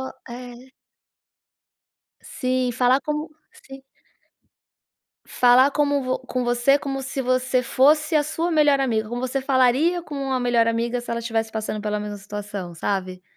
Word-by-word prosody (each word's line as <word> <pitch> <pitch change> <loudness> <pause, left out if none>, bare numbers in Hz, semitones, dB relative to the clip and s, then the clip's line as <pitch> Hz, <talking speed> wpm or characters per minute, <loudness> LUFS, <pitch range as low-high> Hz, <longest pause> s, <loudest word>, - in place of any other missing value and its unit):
Ou 265 - -4 0.2
é. 245 +1 -8 1.7
Sim, 255 -2 -2
falar 255 +2 +3
como 300 +3 -4 0.2
se 270 0 -14 1.4
Falar 250 +3 +4
como 285 -3 0
com 255 -1 -3
você 240 +4 +3
como 270 -1 -4
se 265 +1 -4
você 255 0 +1
fosse 300 +5 +3
a 295 - +3
sua 325 +3 -2
melhor 295 -3 +3
amiga. 220 -5 0
Como 240 +2 -4
você 255 +1 -2
falaria 270 +6 +2
com 300 - -9
uma 270 -2 -2
melhor 240 -2 +2
amiga, 235 +2 -1
se 240 - -9
ela 235 0 -2
estivesse 225 -1 -2
passando 215 -1 -3
pela 210 0 -2
mesma 210 0 -5
situação, 200 -3 -7
sabe? 185 +1 -3
255 Hz, 150 wpm, -23 LUFS, 230-275 Hz, 1.7 s, Falar